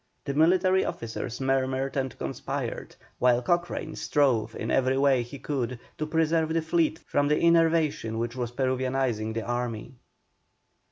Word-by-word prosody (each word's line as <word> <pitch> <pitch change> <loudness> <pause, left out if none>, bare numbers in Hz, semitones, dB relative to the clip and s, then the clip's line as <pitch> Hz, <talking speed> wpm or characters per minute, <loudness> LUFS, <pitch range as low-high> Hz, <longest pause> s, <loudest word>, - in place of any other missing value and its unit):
The 140 - -2
military 185 +5 +4
officers 115 +1 -5
murmured 135 0 0
and 130 -3 -2
conspired, - - -4 0.2
while 125 -1 +3
Cochrane 175 0 -1
strove 120 -7 +1
in - - -3
every 130 0 +2
way 135 -2 +4
he 120 +4 -8
could 125 -4 -3 0.2
to 155 - -2
preserve 160 0 +1
the 165 - +1
fleet 160 -1 +1
from 145 0 +1
the 150 +1 +2
enervation 165 -8 +2
which 120 +1 -3
was 120 -2 -2
Peruvianising 130 -3 -1
the 115 - -2
army. 120 -1 -3
135 Hz, 145 wpm, -27 LUFS, 120-160 Hz, 0.2 s, military